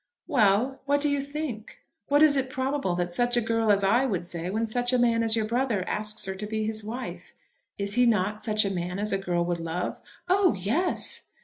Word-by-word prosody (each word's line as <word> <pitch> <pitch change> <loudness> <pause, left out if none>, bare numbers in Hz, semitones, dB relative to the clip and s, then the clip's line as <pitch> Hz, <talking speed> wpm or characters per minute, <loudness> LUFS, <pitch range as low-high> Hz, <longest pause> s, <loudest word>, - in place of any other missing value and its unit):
"Well; 245 - +2
what 285 0 +3
do 295 0 +2
you 285 -1 0
think? 280 -6 -6 0.3
What 290 +2 +4
is 300 -2 +6
it 265 -1 0
probable 260 -7 -1
that 175 0 -2
such 245 +5 +1
a - - +5
girl 225 -1 +1
as 200 -1 +3
I 230 +7 +3
would 185 -7 -2
say 175 0 -5
when 220 +4 -1
such 245 +2 -1
a 255 - +3
man 235 -1 +3
as 225 -1 +2
your 220 -1 0
brother 230 -4 -1
asks 210 0 0
her 190 - -3
to 200 +2 -6
be 215 0 -2
his 215 0 -2
wife? 235 +5 -7 0.4
Is 200 0 -3
he 245 +2 +4
not 210 -1 0
such 215 -2 +2
a 195 - -1
man 180 0 -3
as 210 +1 -2
a 195 - +1
girl 175 -2 -1
would 175 -1 -2
love?" 165 +2 -4 0.3
"Oh 370 - +3
yes." 225 - -1
220 Hz, 225 wpm, -26 LUFS, 195-255 Hz, 0.4 s, is